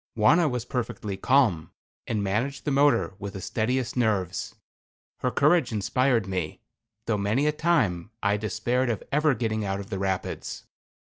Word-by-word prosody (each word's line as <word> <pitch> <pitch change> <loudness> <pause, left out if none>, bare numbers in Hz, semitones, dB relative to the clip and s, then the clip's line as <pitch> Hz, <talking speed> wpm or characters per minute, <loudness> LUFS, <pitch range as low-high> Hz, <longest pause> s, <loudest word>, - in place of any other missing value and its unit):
Wauna 150 +10 +5
was 125 -2 -3
perfectly 110 -5 -3
calm, 110 - +2 0.4
and 105 -2 -1
managed 115 +8 -2
the 150 - 0
motor 140 -10 +3
with 100 -1 -6
the 95 - -6
steadiest 120 +5 -1
nerves. 105 -7 0 0.6
Her 125 - 0
courage 145 +1 +3
inspired 115 +2 +1
me, 90 -5 -3 0.5
though 110 -3 0
many 110 +8 +1
a 150 - +3
time 130 - +1
I 100 0 +3
despaired 110 +4 -1
of 115 - -2
ever 150 -1 +3
getting 110 -2 -1
out 95 -1 -2
of 100 - -9
the 95 - -2
rapids. 95 -1 -3
110 Hz, 160 wpm, -26 LUFS, 100-130 Hz, 0.6 s, Wauna